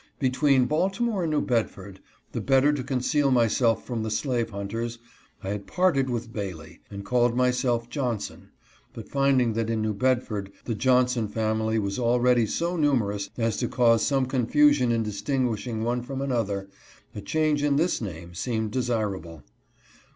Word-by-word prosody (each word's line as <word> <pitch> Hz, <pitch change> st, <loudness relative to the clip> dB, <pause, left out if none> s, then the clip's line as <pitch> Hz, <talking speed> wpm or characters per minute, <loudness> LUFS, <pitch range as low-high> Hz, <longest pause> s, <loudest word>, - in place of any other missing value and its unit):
Between 130 Hz, 0 st, +3 dB
Baltimore 195 Hz, -, 0 dB
and 160 Hz, -, -1 dB
New 150 Hz, -, +2 dB
Bedford, 100 Hz, -5 st, -2 dB, 0.3 s
the -, -, -3 dB
better 135 Hz, +2 st, +3 dB
to 140 Hz, -3 st, -3 dB
conceal 140 Hz, +3 st, +1 dB
my 120 Hz, -3 st, +4 dB
self 115 Hz, +1 st, +1 dB
from 120 Hz, -3 st, -3 dB
the 110 Hz, -, -2 dB
slave 120 Hz, +1 st, -1 dB
hunters, 115 Hz, +3 st, -4 dB, 0.5 s
I 95 Hz, -, -4 dB
had 100 Hz, 0 st, -4 dB
parted 160 Hz, -8 st, +2 dB
with 120 Hz, -1 st, -4 dB
Bailey 90 Hz, -7 st, -6 dB
and 100 Hz, 0 st, -7 dB
oalled 120 Hz, +1 st, +2 dB
myself 125 Hz, -2 st, +1 dB
Johnson; 120 Hz, -4 st, -4 dB, 0.5 s
but -, -, -8 dB
finding 135 Hz, -4 st, +2 dB
that 115 Hz, 0 st, -1 dB
in 110 Hz, -1 st, 0 dB
New 110 Hz, 0 st, 0 dB
Bedford 110 Hz, -4 st, -1 dB
the 115 Hz, -, -2 dB
Johnson 125 Hz, -1 st, +2 dB
family 110 Hz, +1 st, -1 dB
was 100 Hz, -1 st, -2 dB
already 120 Hz, -1 st, +3 dB
so 170 Hz, +9 st, -1 dB
numerous 115 Hz, -, 0 dB
as 115 Hz, -2 st, 0 dB
to -, -, -1 dB
cause 115 Hz, -2 st, +3 dB
some 135 Hz, -2 st, +2 dB
confusion 130 Hz, +1 st, +3 dB
in 115 Hz, -1 st, +1 dB
distinguishing 110 Hz, +1 st, -2 dB
one 120 Hz, +1 st, 0 dB
from 135 Hz, +2 st, -6 dB
another, 110 Hz, -8 st, -1 dB, 0.5 s
a 105 Hz, -, -6 dB
change 155 Hz, +6 st, 0 dB
in 145 Hz, -1 st, +2 dB
this 165 Hz, +1 st, +1 dB
name 85 Hz, -4 st, -7 dB
seemed 110 Hz, +3 st, -2 dB
desirable. 105 Hz, -, -2 dB
120 Hz, 160 wpm, -26 LUFS, 110-135 Hz, 0.5 s, my